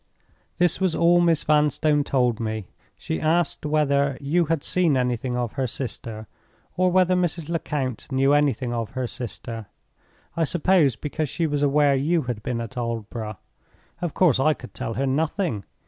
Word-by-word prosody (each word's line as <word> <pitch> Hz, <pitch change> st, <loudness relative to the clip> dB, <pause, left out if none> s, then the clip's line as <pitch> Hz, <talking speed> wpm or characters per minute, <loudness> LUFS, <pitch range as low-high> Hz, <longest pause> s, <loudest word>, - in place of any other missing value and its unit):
"This 175 Hz, 0 st, +2 dB
was 185 Hz, -3 st, +1 dB
all 175 Hz, +1 st, +4 dB
Miss 165 Hz, -3 st, +2 dB
Vanstone 150 Hz, 0 st, +2 dB
told 125 Hz, -5 st, +1 dB
me. 110 Hz, -3 st, -3 dB, 0.3 s
She 80 Hz, -, -4 dB
asked 160 Hz, -1 st, +1 dB
whether 140 Hz, -2 st, +1 dB
you 165 Hz, +5 st, +1 dB
had 160 Hz, -2 st, -1 dB
seen 170 Hz, -7 st, +2 dB
anything 125 Hz, 0 st, -1 dB
of 120 Hz, -3 st, -2 dB
her 135 Hz, -2 st, -1 dB
sister, 115 Hz, -3 st, -5 dB, 0.5 s
or 185 Hz, +1 st, +3 dB
whether 185 Hz, 0 st, +4 dB
Mrs. 170 Hz, -3 st, -1 dB
Lecount 145 Hz, -7 st, -3 dB
knew 135 Hz, +1 st, +3 dB
anything 135 Hz, -4 st, +1 dB
of 115 Hz, -2 st, -3 dB
her 130 Hz, -1 st, -2 dB
sister—I 115 Hz, -, -7 dB
suppose 160 Hz, -4 st, +3 dB
because 150 Hz, +5 st, -3 dB
she 170 Hz, -, -1 dB
was 145 Hz, -2 st, -1 dB
aware 145 Hz, 0 st, +4 dB
you 155 Hz, +4 st, +1 dB
had 120 Hz, -4 st, -4 dB
been 115 Hz, +1 st, -3 dB
at 115 Hz, +3 st, -7 dB
Aldborough. 115 Hz, -2 st, -4 dB, 0.6 s
Of 175 Hz, -3 st, -3 dB
course 165 Hz, -9 st, +4 dB
I 155 Hz, +3 st, +3 dB
could 125 Hz, -, -12 dB
tell 115 Hz, -, -4 dB
her 135 Hz, -, 0 dB
nothing. 150 Hz, -, -1 dB
140 Hz, 160 wpm, -24 LUFS, 125-160 Hz, 0.6 s, all